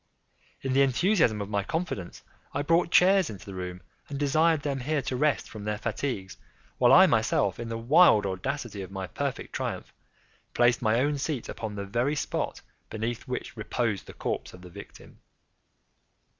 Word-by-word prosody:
In 135 -1 -2
the 135 - +4
enthusiasm 135 - +3
of 100 - -9
my 100 -1 +1
confidence, 160 - -4 0.3
I 145 - 0
brought 165 +3 +2
chairs 185 +1 +5
into 100 -3 -9
the 100 - -8
room, 90 -1 -6 0.3
and 140 - -4
desired 155 +2 +2
them 140 -2 -2
here 145 +2 -1
to 130 - -3
rest 150 +2 +1
from 110 -2 -9
their 105 0 -2
fatigues, 110 -3 -4 0.4
while - - +5
I - - +9
myself, - - +1
in 115 -1 -5
the 115 - -3
wild 120 - +5
audacity 105 +3 -3
of 95 - -7
my 95 -1 -5
perfect 90 - -4
triumph, - - -4 0.6
placed 120 +1 +3
my 110 0 +2
own 145 +2 +1
seat 140 -3 -3
upon 110 -2 -5
the 100 0 -4
very 120 +9 0
spot - - -3 0.3
beneath 115 +3 -4
which 125 0 -5
reposed 110 -2 -2
the - - -10
corpse - - -4
of 90 - -15
the 90 - -11
victim. 100 +3 -13
120 Hz, 175 wpm, -27 LUFS, 105-145 Hz, 0.6 s, I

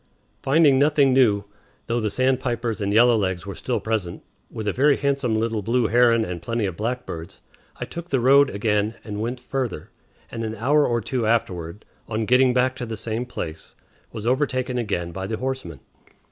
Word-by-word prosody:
Finding 140 -1 +4
nothing 145 -2 +4
new, 110 -6 +4 0.4
though 120 +1 -1
the 110 -2 -1
sandpipers 120 -2 -1
and 100 0 -1
yellowlegs 105 -6 +3
were 100 - -5
still 125 - -2
present, 105 -6 -3 0.3
with 110 -1 -6
a 100 - +1
very 140 +2 +3
handsome 140 -5 0
little 110 -1 -1
blue 115 +4 +1
heron 115 0 +4
and 90 -2 -5
plenty 115 +3 -2
of 95 -3 -3
blackbirds, 105 -7 -5 0.4
I - - -3
took 170 +1 -8
the 135 - +1
road 135 +3 +5
again 105 +1 0
and 105 -1 -5
went 120 +3 -3
further, 125 - -4 0.4
and 115 - -4
an 110 0 -4
hour 145 +7 +2
or 120 -1 0
two 115 +1 -2
afterward, 95 -5 -1 0.2
on 110 0 -2
getting 125 +2 +4
back 130 +1 +1
to 120 - -5
the 110 -1 -5
same 115 +3 -3
place, 80 -9 -7 0.4
was 110 -2 -6
overtaken 130 -1 0
again 90 -7 -2
by 95 +2 -5
the 110 +1 -3
horseman. 130 - -5
115 Hz, 180 wpm, -23 LUFS, 105-130 Hz, 0.4 s, road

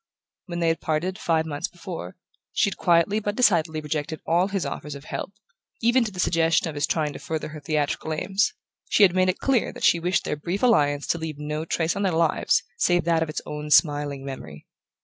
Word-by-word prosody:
When 175 -1 -4
they 165 - +3
had 165 - -1
parted, 170 +4 -1
five 160 -1 +1
months 150 +3 -3
before, 175 - -8 0.4
she 200 - +2
had - - -5
quietly 175 +4 +3
but 205 -1 -3
decidedly 165 -9 +2
rejected 150 0 -3
all 175 +3 +2
his 195 -5 -2
offers 145 +1 -5
of 140 - -10
help, 190 - -5 0.5
even 240 +2 +3
to 215 - -4
the 185 - -9
suggestion 165 -1 +2
of 160 - -4
his 145 0 0
trying 150 -3 0
to - - -8
further 160 -1 -4
her 155 0 -8
theatrical 150 +1 -1
aims: 195 +6 +1 0.4
she 210 - +4
had 185 -3 +6
made 185 0 +3
it 185 - 0
clear 265 -5 +1
that - - -10
she 170 - +5
wished 175 +1 0
their - - -2
brief 175 +8 -3
alliance 145 - +3
to 170 - 0
leave 160 -2 -5
no 150 +1 -4
trace 165 0 0
on 200 - -2
their 190 -3 +1
lives 165 -1 +2 0.2
save 175 -1 +3
that 165 -1 +2
of 160 - -1
its 155 - -3
own 150 0 -6
smiling 145 -3 +3
memory. 80 - -8
165 Hz, 220 wpm, -25 LUFS, 150-185 Hz, 0.5 s, had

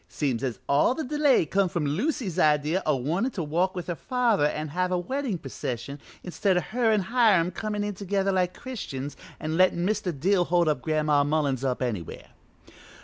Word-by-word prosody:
Seems 130 -6 -1
as 125 -4 -2
all 145 - +3
the 315 - -3
delay 290 - +3
come 190 +4 +1
from 170 -3 -2
Lucy's 190 - -1
idea 155 +3 +2
o' 150 - +3
wantin' 170 - -1
to 180 - -3
walk 175 +5 0
with 180 - -4
her 175 - -2
father 235 - +1
an' 155 0 -4
have 180 +4 -1
a 180 - +2
weddin' 255 +3 -2
procession, 135 -1 -5 0.3
instid 185 +1 +1
o' - - +2
her 235 -1 +2
an' 215 -2 +3
Hiram 205 -5 +3
comin' 210 0 -3
in 205 0 -2
together 195 0 -1
like 180 -1 0
Christians 145 - -6 0.2
an' 155 +1 -2
lettin' 180 -1 +3
Mr. 205 -2 0
Dill 180 +3 +2
hold 175 0 +2 0.2
Gran'ma 150 -2 +2
Mullins 145 -3 0
up 130 -1 -1
anywhere. 105 -10 -5
180 Hz, 185 wpm, -26 LUFS, 150-205 Hz, 0.3 s, all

